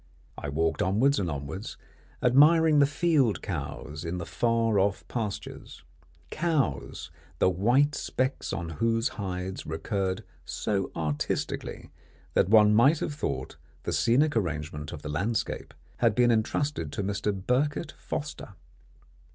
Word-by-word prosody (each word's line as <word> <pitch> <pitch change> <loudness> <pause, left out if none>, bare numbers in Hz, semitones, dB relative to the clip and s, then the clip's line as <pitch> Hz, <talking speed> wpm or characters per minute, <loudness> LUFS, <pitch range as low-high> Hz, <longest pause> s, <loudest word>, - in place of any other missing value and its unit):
I 75 - -5
walked 80 +2 0
onwards 120 +10 +3
and 90 - -1
onwards, 70 +8 -5 0.5
admiring 150 +4 +6
the 140 - +6
field 145 - +2
cows 80 -3 -5
in 85 +1 -3
the 85 - -4
far 115 0 +1
off 100 0 0
pastures 105 -8 -5 0.5
cows 150 - -1 0.3
the 95 - +3
white 125 +11 +3
specks 130 -1 -2
on 85 -1 -3
whose 115 0 +2
hides 95 -2 -5
recurred 95 +4 -2 0.2
so 100 -3 -2
artistically 75 -2 -3 0.4
that - - +3
one 105 -1 +7
might 135 +9 +5
have 150 - -3
thought 145 - -4 0.3
the - - -2
scenic 135 +5 +3
arrangement 75 -6 -2
of 75 - -8
the - - -5
landscape 100 +10 -2 0.3
had - - +3
been 120 -1 +4
entrusted 110 - 0
to 100 - -2
Mr. 100 +1 -1
Birket 125 - -1
Foster. 145 -9 -6
105 Hz, 130 wpm, -28 LUFS, 85-130 Hz, 0.5 s, one